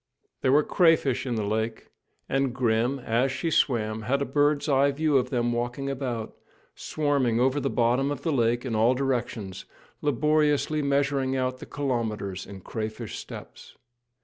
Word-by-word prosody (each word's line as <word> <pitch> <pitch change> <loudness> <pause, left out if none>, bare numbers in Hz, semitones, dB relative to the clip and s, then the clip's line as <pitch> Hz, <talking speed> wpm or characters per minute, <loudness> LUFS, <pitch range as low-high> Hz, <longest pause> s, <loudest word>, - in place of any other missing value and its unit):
There 130 - +2
were 150 +2 +5
many - - -16
crayfish 145 -7 +3
in 120 - -1
the 110 - -1
lake, 110 +2 -3 0.4
and 135 -2 0
Grim, 120 +1 +1
as 125 +1 0
she 145 +5 -2
swam, 110 -6 +1
had 130 +6 0
a 140 - -1
bird's 145 +2 +1
eye 140 -1 +4
view 150 +1 0
of 130 -1 +2
them 120 -2 0
walking 120 +3 -2
about, 125 -5 -4 0.4
swarming 140 -6 0
over 130 +3 +2
the 135 0 -1
bottom 125 +3 +2
of 145 - -4
the 165 - 0
lake 120 0 +1
in 125 - -2
all 115 +4 +3
directions, 120 -7 -2 0.4
laboriously 150 +1 +2
measuring 140 -1 +1
out 130 0 -1
the - - -9
kilometres 110 -9 -3
in 100 -1 -10
crayfish 110 +3 -5
steps. - - -11
130 Hz, 165 wpm, -26 LUFS, 115-140 Hz, 0.4 s, were